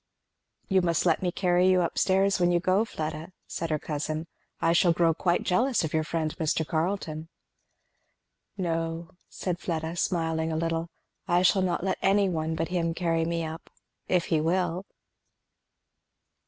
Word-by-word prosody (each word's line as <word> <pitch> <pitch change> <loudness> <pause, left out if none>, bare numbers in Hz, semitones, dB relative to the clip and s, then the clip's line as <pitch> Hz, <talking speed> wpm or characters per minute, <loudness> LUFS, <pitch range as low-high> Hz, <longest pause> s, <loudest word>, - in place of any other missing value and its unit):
"You 190 -2 +3
must 170 -1 +1
let 165 -3 +3
me 180 -1 0
carry 180 0 +3
you 185 -1 +4
up 170 - -2
stairs 195 +1 +3
when 175 0 +3
you 175 - +3
go, 185 +4 +2
Fleda," 160 -1 -5
said 165 - -4
her 155 - +1
cousin. 155 +1 -3 0.3
"I 165 - +3
shall 170 +1 +4
grow 165 0 +3
quite 175 +2 0
jealous 245 +6 +2
of 160 - -3
your 160 0 +2
friend 155 -1 -2
Mr. 160 0 0
Carleton." 160 -2 -2 1.3
"No," 165 -2 -2 0.2
said 180 -2 -3
Fleda 160 -1 -3
smiling 165 -2 0
a 160 - -1
little, 165 0 -1 0.4
"I 175 +1 +3
shall 190 +1 +4
not 180 -2 0
let 190 - -1
any 195 0 +3
one 160 -2 -2
but 165 0 -2
him 170 -2 -1
carry 165 -2 0
me 170 0 -1
up, 160 +1 -8 0.4
if 180 -2 +2
he 155 - +3
will." 180 +2 0
170 Hz, 165 wpm, -27 LUFS, 160-180 Hz, 1.3 s, you